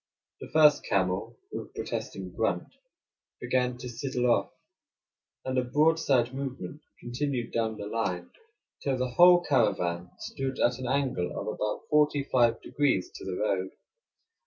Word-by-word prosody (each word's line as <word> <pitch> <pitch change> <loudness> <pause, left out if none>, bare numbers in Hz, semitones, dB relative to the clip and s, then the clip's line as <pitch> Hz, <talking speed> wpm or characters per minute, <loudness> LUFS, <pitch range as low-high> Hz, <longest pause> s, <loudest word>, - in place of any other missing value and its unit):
The - - -9
first 150 -2 +6
camel, 95 -1 -1
with - - -5
a - - -28
protesting - - -5
grunt, - - -1 0.7
began 125 -1 0
to 125 +1 -7
sidle 125 0 -1
off, - - +1 0.9
and 130 0 -2
the 130 - +3
broadside 140 -3 +2
movement 135 +2 -5 0.2
continued 125 0 -3
down 110 -1 -1
the 100 - -6
line 100 -5 -2 0.5
till 135 -2 0
the 125 0 -1
whole 175 +5 +7
caravan 90 - +1
stood 135 -1 -4
at 120 +1 +2
an 130 - -4
angle 130 -9 -1
of - - -5
about 105 0 -2
forty 150 -1 +3
five 120 -4 +2
degrees 140 -11 0
to - - -10
the 95 -1 -3
road. 95 -3 0
125 Hz, 145 wpm, -28 LUFS, 110-140 Hz, 0.9 s, whole